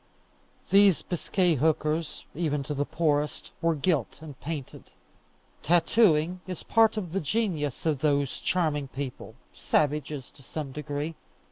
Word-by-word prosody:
These 200 -3 +6
Biscay 175 -1 +1
hookers, 155 +2 0
even 150 -3 -1
to 150 - -4
the 145 0 -1
poorest, 150 -2 0
were 165 -1 +2
gilt 155 +1 0
and 155 -1 -9
painted. 150 -4 -6 0.7
Tattooing 175 0 +3
is 185 -3 -6
part 225 -1 +4
of 180 -6 -3
the 195 - -1
genius 155 - -1
of 155 -4 +1
those 140 -2 +1
charming 155 -6 0
people, 135 0 -6 0.2
savages 150 -2 -1
to - - -18
some 140 +1 -5
degree. 145 +2 -4
155 Hz, 130 wpm, -27 LUFS, 145-175 Hz, 0.7 s, These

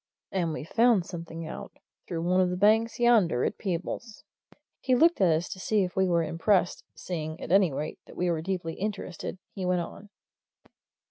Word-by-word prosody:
And 175 -4 0
we've 155 0 -5
found 230 -5 +3
something 165 -2 -7
out 155 - -8 0.3
through 165 -2 -3
one 180 +2 +3
of 180 - +2
the 180 - -2
banks 220 +4 +3
yonder 220 - +4
at - - -3
Peebles." 195 +4 -4 0.6
He 255 -1 +2
looked 330 0 +4
at 190 - +6
us 160 -1 +3
as - - -6
if - - -10
to 185 - -13
see 210 +1 +1
if 180 -1 -4
we 190 0 +3
were 170 -2 +2
impressed; 175 +3 +1
seeing, 160 -2 -5
at - - -6
any 190 -3 +5
rate, 150 +3 -4
that - - -14
we 180 0 +1
were 160 -2 -1
deeply 175 -2 -3
interested, 195 -3 -4 0.2
he 190 - -5
went 180 -1 +1
on. 200 +4 -9
180 Hz, 200 wpm, -28 LUFS, 165-205 Hz, 0.6 s, at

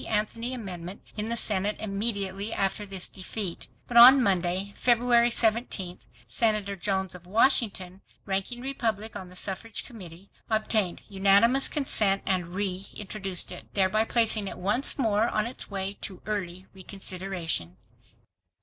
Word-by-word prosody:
Anthony 230 +3 -1
amendment 185 -4 -7
in 215 +1 -2
the 235 - 0
Senate 210 -2 +1
immediately 200 -1 -2
after 200 +1 -1
this 190 -2 -2
defeat. 190 -1 -6 0.2
But 240 - 0
on 255 +3 +10
Monday, 190 0 0
February 240 0 +3
17, 220 -6 +1 0.3
Senator 205 - +1
Jones 190 -1 -2
of 180 -1 -12
Washington, 200 -4 +1 0.2
ranking 195 +5 -2
Republican 225 -6 -3
on 185 - -11
the 180 - -14
Suffrage 200 +4 -3
Committee, 190 -5 -12 0.2
obtained 215 -4 0
unanimous 200 +7 +4
consent 210 -9 +1
and 185 -3 0
reintroduced 195 0 -3
it, - - -10
thereby 200 +2 +2
placing 225 -3 +3
it - - -7
once 205 +9 +2
more 220 -4 +2
on 215 0 0
its 240 - -6
way 195 -1 -3
to 190 -3 -4
early 185 -3 -4
reconsideration. 185 - -4
200 Hz, 130 wpm, -27 LUFS, 190-225 Hz, 0.3 s, on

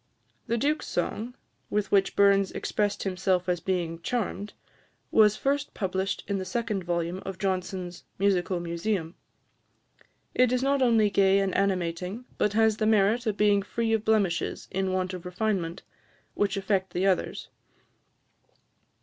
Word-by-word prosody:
The 235 - 0
Duke's 295 +6 0
song, 225 +7 -3 0.3
with 210 -1 -1
which 195 -1 +3
Burns 200 -1 +4
expressed 205 -1 -1
himself 185 -1 0
as 180 -1 +1
being 170 -3 -2
"charmed," 210 -2 -3 0.6
was 215 -1 +5
first 285 +1 -1
published 190 0 -2
in 200 -1 -1
the - - -3
second 210 0 -2
volume 175 +1 -2
of 190 -1 -6
Johnson's 185 -2 -3
"Musical 190 -2 +1
Museum." 170 0 -2 1.2
It 250 -1 +3
is 255 0 +1
not 275 0 +2
only 225 -4 +4
gay 195 -1 +4
and 195 -2 +1
animating, 185 +3 -1
but 205 - +2
has 220 -1 +3
the 215 - +1
merit 220 +3 +3
of 210 -2 0
being 205 -1 +4
free 225 +3 -1
of 220 -1 +1
blemishes 205 -6 0
in 190 0 -1
want 185 0 -1
of 180 -2 -6
refinement, 180 -2 -2 0.5
which 200 -1 0
affect 190 -2 -1
the 180 +2 0
others. 190 -2 0
195 Hz, 145 wpm, -27 LUFS, 185-215 Hz, 1.2 s, was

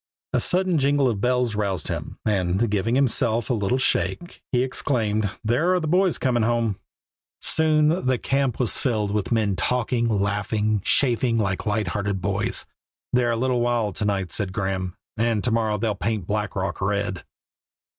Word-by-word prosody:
A - - +3
sudden 180 -3 +1
jingle 140 0 +3
of 110 -5 -1
bells 125 -1 +1
roused 100 -6 -2
him, - - -5
and, 100 +1 +1
giving 105 +4 +1
himself 120 -3 +2
a - - +3
little 105 +2 0
shake, 130 - -1
he 125 -1 +2
exclaimed, 110 -5 0
"There 150 +12 +2
are - - +2
the 165 - -3
boys 180 +2 +2
coming 120 -3 +1
home." 115 -3 0 0.6
Soon 155 -1 +2
the 130 -1 +2
camp 135 -1 0
was 125 -4 +2
filled 110 -6 0
with 105 0 -2
men 110 -4 +1
talking, 120 +5 0
laughing, 105 +1 0
chaffing 120 -2 +2
like 100 -2 -1
light 105 0 0
hearted 100 -2 -2
boys. 100 +2 -2 0.5
"They 125 0 +3
are - - +1
a 115 - 0
little 125 0 +1
wild 120 -5 0
to 105 - -1
night," 100 -3 -1
said 100 -3 -3
Graeme, 95 -2 -2 0.2
"and 115 -2 +1
to 120 - +1
morrow 110 -2 +1
they'll 110 0 0
paint 105 -1 -2
Black 105 +1 -2
Rock 95 -1 -3
red." 100 -3 -1
110 Hz, 175 wpm, -24 LUFS, 100-125 Hz, 0.6 s, A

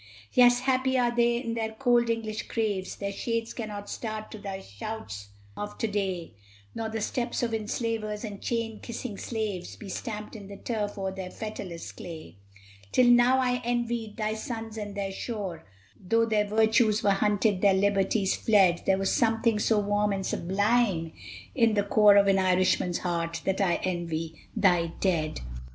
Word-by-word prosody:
Yes, 245 0 +6
happy 260 0 +2
are 240 -1 +2
they 235 0 +3
in 235 -2 -3
their 220 -1 -2
cold 240 0 +2
English 220 -1 -2
graves! 205 -5 -2
Their 200 0 -3
shades 230 +2 -2
cannot 210 -3 -6
start 215 -1 -5
to 215 - -8
thy 195 -2 -5
shouts 100 - -7 0.3
of 205 - -6
to - - -1
day, 190 - -2 0.4
Nor 225 -1 -3
the 220 0 -3
steps 240 +3 -2
of 230 -1 -1
enslavers 215 -1 -2
and 205 -3 -6
chain 230 -2 -2
kissing 235 -2 -6
slaves 215 -6 -4
Be 205 - -10
stamped 210 +3 -5
in 205 -3 -9
the 200 0 -9
turf 210 -3 -3
o'er 190 -1 -2
their 190 -1 -6
fetterless 185 -5 -6
clay. 160 - -9 0.5
Till 250 -1 +5
now 245 +2 +6
I 255 -1 +2
had 250 0 -1
envied 235 -2 -2
thy 215 -1 -1
sons 225 0 -5
and 205 -2 -5
their 195 -1 -2
shore, 195 -5 -5 0.4
Though 230 +5 +3
their 215 -2 +2
virtues 220 +1 +3
were 200 - +4
hunted, 205 0 +2
their 200 -2 +5
liberties 195 0 +2
fled; 190 -6 +4
There 190 - +4
was 195 0 0
something 225 -1 +2
so 220 +1 +2
warm 205 0 +1
and 195 -1 -3
sublime 195 -3 +1 0.4
in 230 -4 +3
the 205 - +2
core 205 0 +6
Of 200 0 +6
an 195 -1 +4
Irishman's 185 -1 +2
heart, 170 -2 -2
that 195 +1 0
I 180 -3 +3
envy 165 -3 -3
thy 175 -5 +3
dead. 160 - 0
210 Hz, 170 wpm, -28 LUFS, 195-230 Hz, 0.5 s, Yes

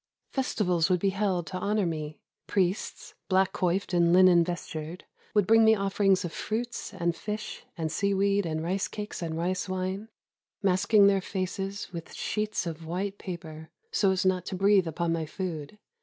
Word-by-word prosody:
Festivals 190 - +1
would 180 -1 +3
be 195 +2 +1
held 190 -3 0
to 185 +1 -5
honor 205 +1 +1
me. 155 -2 -4 0.3
Priests, 190 0 -1 0.2
black 190 0 +3
coiffed 185 +2 0
and 170 -1 +4
linen 180 -1 +7
vestured, 170 -1 -5 0.3
would 205 -2 +4
bring 225 +3 +6
me 220 0 +6
offerings 195 -2 +2
of 165 - -5
fruits 235 +8 -3
and 170 -4 -1
fish 210 +2 -5
and 160 -2 -2
seaweed 200 +2 +2
and 160 0 -2
rice 190 +3 -1
cakes 210 -2 -6
and 160 -1 -3
rice 180 +3 -1
wine, 185 +3 -3 0.3
— - - -66
masking 200 +2 +4
their 200 -1 +4
faces 195 +1 -4
with 170 -1 -7
sheets 210 -2 -2
of 165 -1 -5
white 195 +4 -3
paper, 160 -4 -7 0.2
so 205 - +3
as 190 0 +1
not 185 -1 +2
to 190 - -3
breathe 195 -1 +4
upon 165 +1 -1
my 160 -2 -2
food. 165 0 -5
185 Hz, 170 wpm, -28 LUFS, 170-200 Hz, 0.3 s, linen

